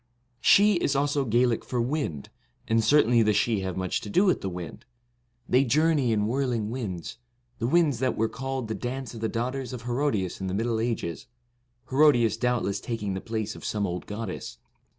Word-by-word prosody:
Sidhe 205 -1 +6
is 145 -4 0
also 140 0 +1
Gaelic 120 0 +2
for 125 - -3
wind, 120 - -2 0.4
and 115 0 +2
certainly 120 -1 +4
the 105 -1 +3
Sidhe 105 0 +1
have 95 -1 -4
much 95 -1 -1
to 105 - -7
do 185 - +3
with 185 - +2
the 95 - -2
wind. 85 -4 -7 0.6
They 130 +2 +4
journey 145 -1 +2
in 105 -2 +1
whirling 120 -3 -1
winds, 110 -4 -5 0.4
the 115 - 0
winds 150 -4 +3
that 130 -1 0
were 110 - +2
called 135 0 -4
the 110 - -3
dance 125 +1 -5
of 115 - -8
the 110 - 0
daugh 120 +3 -1
ters 130 -2 -5
of 120 -2 -7
Herodias 120 -8 -1
in 95 - -2
the 95 - -2
Middle 115 +1 0
Ages, 110 -8 -3 0.6
Hero 150 +3 +6
dias 115 -3 +2
doubtless 115 -4 0
taking 105 -4 -3
the 95 - -4
place 110 -2 -3
of - - -11
some 105 -1 -1
old 90 -1 -4
goddess. 105 - -6
115 Hz, 195 wpm, -26 LUFS, 105-130 Hz, 0.6 s, Sidhe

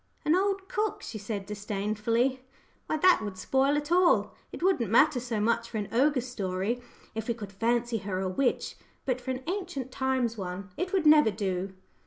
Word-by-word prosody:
"An 310 - +4
old 390 0 0
cook!" 425 +1 -2
she 220 - -6
said 205 -1 -4
disdainfully. 215 +5 -1 0.4
"Why, 310 - 0
that 360 -3 +5
would 205 -3 -5
spoil 270 +8 +2
it 295 +2 -4
all. 355 0 +4 0.2
It - - -7
wouldn't 365 - +2
matter 265 +4 +5
so 235 -3 -3
much 230 +2 +1
for 225 - -4
an 205 -2 -3
ogre 265 +3 +3
story, 215 -1 -2 0.3
if 220 0 -4
we 235 - 0
could 205 -3 -8
fancy 235 +3 0
her 190 -2 -3
a 190 - -1
witch, 245 +8 0 0.3
but 255 -1 -1
for 255 - -7
an 260 0 -3
'ancient 320 -9 -4
times' 255 -4 0
one, 185 +1 -5
it 365 +2 -3
would 375 -5 +1
never 300 -5 +7
do." 190 -2 -3
235 Hz, 190 wpm, -28 LUFS, 205-290 Hz, 0.4 s, never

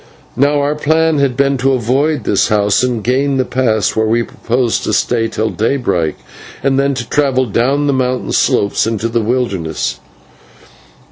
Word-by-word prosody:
Now, 145 +3 +2
our 145 +1 0
plan 160 +1 +1
had 135 -3 0
been 140 -1 +1
to 135 +2 +2
avoid 135 +6 0
this - - +1
house 105 -1 +2
and 125 -4 -1
gain 135 +3 +1
the 130 - +1
pass, 115 -6 0
where 110 0 +1
we 115 +2 +1
proposed 120 0 -1
to - - -1
stay 115 -2 +1
till 110 0 -2
daybreak, 105 - -1 0.5
and 135 0 +2
then 140 0 +1
to 120 -2 -5
travel 135 -2 +1
down 130 +6 0
the 140 - +1
mountain 130 -1 -1
slopes 100 +2 +1
into 115 0 -1
the 115 0 -1
wilderness. 95 - -2
125 Hz, 165 wpm, -15 LUFS, 110-140 Hz, 0.5 s, Now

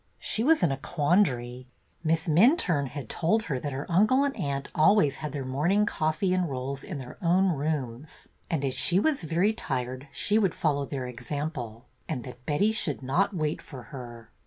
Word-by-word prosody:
She 220 - +2
was 320 +4 +4
in 165 - +3
a 135 - -1
quandary. 135 -6 0 0.4
Miss 160 +1 0
Minturne 170 - +4
had 140 -3 -7
told 215 - +1
her 145 -10 -2
that 145 +2 -4
her 140 +2 -4
uncle 215 +10 +4
and 280 -1 -1
aunt 140 -1 -3
always 155 -3 +4
had 150 -1 -5
their 140 -2 -4
morning 170 +11 +2
coffee 170 +1 0
and 180 -3 0
rolls 135 +1 -4
in 185 - -6
their 130 -2 -9
own 185 +2 +3
rooms, 145 -4 -3 0.2
and 150 -4 -1
as 130 - -1
she 155 +8 +4
was 300 +5 +1
very 175 +6 +1
tired 130 - -4
she 210 +9 +1
would 195 -5 +1
follow 145 -3 0
their 135 -2 -4
example, 125 -1 -5 0.2
and 125 - -3
that 125 -1 -10
Betty 195 +9 +2
should 155 - 0
not 185 +10 +1
wait 155 -2 -1
for 130 -5 -10
her. 120 -3 -9
150 Hz, 185 wpm, -27 LUFS, 130-185 Hz, 0.4 s, was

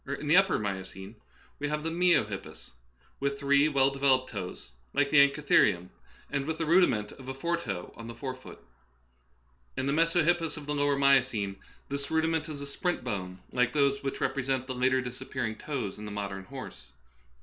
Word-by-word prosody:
In 140 +2 -4
the 155 - +5
upper 190 0 +5
Mio 100 -2 -2
cene 95 +2 -9 0.5
we 145 - -1
have 150 0 -2
the 165 - -2
miohippus, 165 - 0 0.5
with 140 0 -1
three 140 +1 +4
well 135 -2 +3
de 135 - -8
veloped 130 -2 +3
toes 90 - -7 0.2
like 140 -1 +2
the 150 - +7
anchitherium, 140 -10 +4 0.4
and 140 -1 -1
with 160 0 -2
the 165 - -1
rudiment 155 - +3
of 130 - -12
a 135 - -4
fore 170 +6 0
toe 100 - -5
on 115 - -9
the 115 - -7
fore 130 +2 -4
foot. 130 0 -12 1.2
In - - -1
the 140 - +1
mesohippus 165 +1 +2
of 150 - -8
the 150 - -2
lower 145 -1 +2
Miocene 130 -8 +3 0.3
this 140 0 -4
rudiment 160 -1 +1
is 145 -2 -6
a - - -5
splint 175 +6 -2
bone, 95 -6 -4
like 125 -1 +1
those 140 -1 +2
which 135 -1 -3
represent 130 -1 0
the 130 - -4
later 130 +1 +2
disappearing 125 -2 -4
toes 115 -6 -4
in 105 - -7
the 105 - -6
modern 100 -2 -4
horse. 130 +3 -9
135 Hz, 190 wpm, -29 LUFS, 115-150 Hz, 1.2 s, the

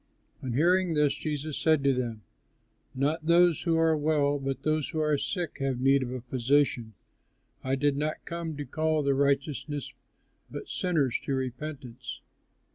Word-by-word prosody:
On 130 -3 -3
hearing 175 +4 +3
this, 150 -1 +3
Jesus 150 -1 -4
said 155 -3 +3
to 140 -1 +4
them, 120 -4 -3 0.7
"Not 155 +4 0
those 170 -1 +5
who 165 -2 +1
are 165 -1 +4
well, 145 -1 +1
but 135 0 -3
those 155 -1 0
who 160 - -3
are 150 -1 +2
sick 170 +3 -3
have 135 -2 -1
need 135 +1 +4
of 125 - -3
a 130 -1 -4
physician. 125 -2 +1 0.7
I 130 +1 +1
did 145 +1 +1
not 150 +2 -3
come 170 -3 -4
to 145 - -4
call 155 +3 0
the 140 0 +2
righteous 140 +1 +1 0.9
but - - -7
sinners 155 -9 0
to 135 - 0
repentance." 130 -1 -5
145 Hz, 160 wpm, -28 LUFS, 135-155 Hz, 0.9 s, those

